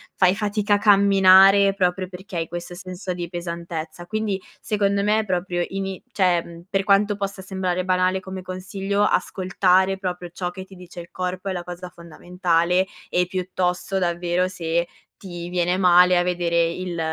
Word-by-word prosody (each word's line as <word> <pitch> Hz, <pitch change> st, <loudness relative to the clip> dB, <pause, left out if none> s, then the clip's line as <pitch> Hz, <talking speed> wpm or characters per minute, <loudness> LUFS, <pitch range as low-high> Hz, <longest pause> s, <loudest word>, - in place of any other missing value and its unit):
fai 185 Hz, 0 st, +3 dB
fatica 210 Hz, 0 st, 0 dB
a -, -, +2 dB
camminare 195 Hz, -1 st, +6 dB
proprio 185 Hz, -1 st, 0 dB
perché 185 Hz, -1 st, -8 dB
hai 165 Hz, -, -2 dB
questo 175 Hz, +1 st, -7 dB
senso 185 Hz, 0 st, -6 dB
di 175 Hz, -1 st, -5 dB
pesantezza. 170 Hz, -1 st, -6 dB
Quindi 210 Hz, -1 st, -2 dB, 0.2 s
secondo 200 Hz, -1 st, 0 dB
me, 215 Hz, +1 st, +2 dB
proprio 180 Hz, -2 st, -1 dB
ini 195 Hz, -1 st, -4 dB
cioè 175 Hz, -4 st, 0 dB
per 195 Hz, 0 st, 0 dB
quanto 205 Hz, +1 st, +3 dB
possa 195 Hz, -1 st, -5 dB
sembrare 185 Hz, -1 st, -2 dB
banale 185 Hz, 0 st, +1 dB
come 190 Hz, 0 st, -7 dB
consiglio, 190 Hz, +2 st, -2 dB
ascoltare 190 Hz, -1 st, +2 dB
proprio 180 Hz, -2 st, -4 dB
ciò 180 Hz, -1 st, -3 dB
che 190 Hz, +1 st, -8 dB
ti 190 Hz, -, -17 dB
dice 180 Hz, -1 st, -10 dB
il 170 Hz, -, -13 dB
corpo 185 Hz, +1 st, -4 dB
è -, -, -2 dB
la 175 Hz, -1 st, -4 dB
cosa 180 Hz, +1 st, -8 dB
fondamentale, 175 Hz, +1 st, -1 dB, 0.2 s
e 180 Hz, 0 st, +1 dB
piuttosto 185 Hz, 0 st, -2 dB
davvero, 175 Hz, +1 st, 0 dB
se 170 Hz, -2 st, -2 dB, 0.3 s
ti 175 Hz, -2 st, -8 dB
viene 180 Hz, 0 st, 0 dB
male 180 Hz, -1 st, +5 dB
a 175 Hz, -, +3 dB
vedere 175 Hz, -1 st, +1 dB
il 175 Hz, -1 st, -5 dB
185 Hz, 160 wpm, -22 LUFS, 175-195 Hz, 0.3 s, camminare